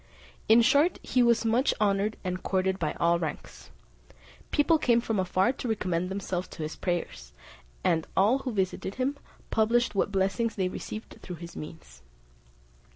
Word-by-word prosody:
In 230 Hz, +2 st, +7 dB
short, 290 Hz, +8 st, +4 dB
he 255 Hz, -, +2 dB
was 235 Hz, -1 st, +3 dB
much 235 Hz, +5 st, +2 dB
honoured 205 Hz, 0 st, +1 dB
and 185 Hz, -1 st, -3 dB
courted 190 Hz, 0 st, 0 dB
by 155 Hz, -, -1 dB
all 170 Hz, 0 st, +2 dB
ranks. 160 Hz, -3 st, -6 dB, 0.8 s
People 315 Hz, +2 st, +3 dB
came 235 Hz, -5 st, +3 dB
from 225 Hz, -3 st, -1 dB
afar 185 Hz, +5 st, +2 dB
to 255 Hz, -, -5 dB
recommend 180 Hz, -5 st, -1 dB
themselves 185 Hz, -2 st, -3 dB
to 160 Hz, -, -7 dB
his 155 Hz, -, -5 dB
prayers; -, -, -4 dB, 0.5 s
and 160 Hz, -1 st, +1 dB
all 215 Hz, +8 st, +4 dB
who 265 Hz, -1 st, -4 dB
visited 190 Hz, -1 st, -2 dB
him, 260 Hz, +2 st, -1 dB, 0.4 s
published 230 Hz, +2 st, +2 dB
what 200 Hz, 0 st, 0 dB
blessings 200 Hz, +4 st, 0 dB
they 185 Hz, -2 st, 0 dB
received 215 Hz, +4 st, -7 dB
through 180 Hz, -, -7 dB
his 170 Hz, +1 st, -10 dB
means. 150 Hz, -, -10 dB
195 Hz, 155 wpm, -28 LUFS, 180-235 Hz, 0.8 s, In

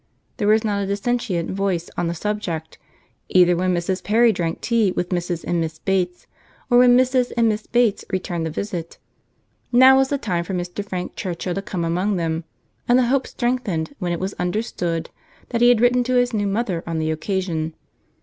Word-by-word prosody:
There 205 Hz, -, 0 dB
was 215 Hz, +1 st, +4 dB
not 205 Hz, -2 st, 0 dB
a 195 Hz, -, -2 dB
dissentient 200 Hz, -3 st, -1 dB
voice 190 Hz, -3 st, -1 dB
on 175 Hz, -, -1 dB
the 170 Hz, -, -2 dB
subject, 170 Hz, -5 st, -4 dB, 0.5 s
either 180 Hz, -1 st, +5 dB
when 185 Hz, +1 st, +1 dB
Mrs. 180 Hz, +2 st, -2 dB
Perry 230 Hz, +2 st, +4 dB
drank 170 Hz, -5 st, -2 dB
tea 230 Hz, -5 st, +2 dB
with 180 Hz, 0 st, -2 dB
Mrs. 175 Hz, -2 st, -2 dB
and 175 Hz, -1 st, 0 dB
Miss 160 Hz, -1 st, -3 dB
Bates, 180 Hz, 0 st, -1 dB, 0.5 s
or 245 Hz, -, +7 dB
when 245 Hz, 0 st, +7 dB
Mrs. 255 Hz, -1 st, +2 dB
and 230 Hz, -1 st, +4 dB
Miss 215 Hz, -1 st, -1 dB
Bates 240 Hz, -4 st, +2 dB
returned 180 Hz, -3 st, -2 dB
the -, -, -3 dB
visit. 170 Hz, 0 st, -5 dB, 0.7 s
Now 260 Hz, +2 st, +7 dB
was 270 Hz, 0 st, +3 dB
the 285 Hz, -, 0 dB
time 180 Hz, -9 st, -2 dB
for 190 Hz, +2 st, -4 dB
Mr. 175 Hz, +3 st, -4 dB
Frank 185 Hz, -3 st, -5 dB
Churchill 180 Hz, 0 st, -3 dB
to 195 Hz, -, -3 dB
come 180 Hz, -3 st, -3 dB
among 180 Hz, +5 st, 0 dB
them; 165 Hz, -2 st, -2 dB, 0.4 s
and 245 Hz, -, +5 dB
the 255 Hz, -, +4 dB
hope 270 Hz, 0 st, +1 dB
strengthened 240 Hz, -, -2 dB
when 180 Hz, -3 st, -2 dB
it 170 Hz, -, -2 dB
was 190 Hz, +2 st, -3 dB
understood 180 Hz, -3 st, -2 dB, 0.4 s
that 235 Hz, -1 st, -1 dB
he 240 Hz, -, +7 dB
had 245 Hz, -2 st, +5 dB
written 245 Hz, 0 st, +4 dB
to 255 Hz, +1 st, 0 dB
his 245 Hz, 0 st, +2 dB
new 205 Hz, -2 st, 0 dB
mother 195 Hz, -4 st, -1 dB
on 165 Hz, -1 st, -2 dB
the 160 Hz, 0 st, 0 dB
occasion. 160 Hz, -1 st, -2 dB
195 Hz, 200 wpm, -22 LUFS, 175-235 Hz, 0.7 s, or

